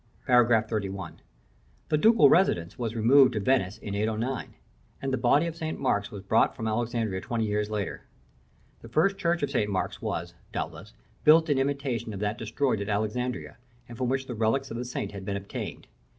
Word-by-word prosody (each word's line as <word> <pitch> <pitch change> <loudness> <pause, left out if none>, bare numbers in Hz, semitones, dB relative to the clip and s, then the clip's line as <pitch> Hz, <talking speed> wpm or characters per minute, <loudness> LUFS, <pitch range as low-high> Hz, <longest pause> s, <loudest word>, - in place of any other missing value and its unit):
§ 125 -2 +5 0.2
XXXI. 100 -4 -3 0.8
The 155 - +3
Ducal 225 +5 +6
residence 85 - +2
was 115 -1 -3
removed 125 +3 +5
to 110 - -1
Venice 105 -3 +1
in 100 - -6
809, 110 +5 -2 0.4
and 135 -1 -3
the - - +2
body 135 +6 +3
of 165 -1 -4
St. 160 -1 -4
Mark 105 -5 0
was 100 -3 -8
brought 110 +3 +2
from 110 - -4
Alexandria 110 -3 -1
twenty 115 +1 -2
years 105 0 -1
later. 105 -2 -4 0.7
The 115 - -11
first 195 - +2
church 170 -4 0
of 140 - -1
St. 105 -7 0
Mark's 95 -2 -2
was, - - -3 0.2
doubtless, - - -6 0.3
built 160 +1 +6
in 135 - +2
imitation 135 -5 -2
of - - -6
that 105 +3 -2
destroyed 115 0 -1
at 100 - -4
Alexandria, 110 +4 -2 0.3
and 120 - -9
from 125 +1 -1
which 135 0 -1
the 125 - -5
relics 115 +5 0
of 115 - -4
the 125 - -4
saint 125 - -4
had 100 -2 -8
been 100 +1 -2
obtained. 100 0 -6
115 Hz, 190 wpm, -27 LUFS, 105-135 Hz, 0.8 s, Ducal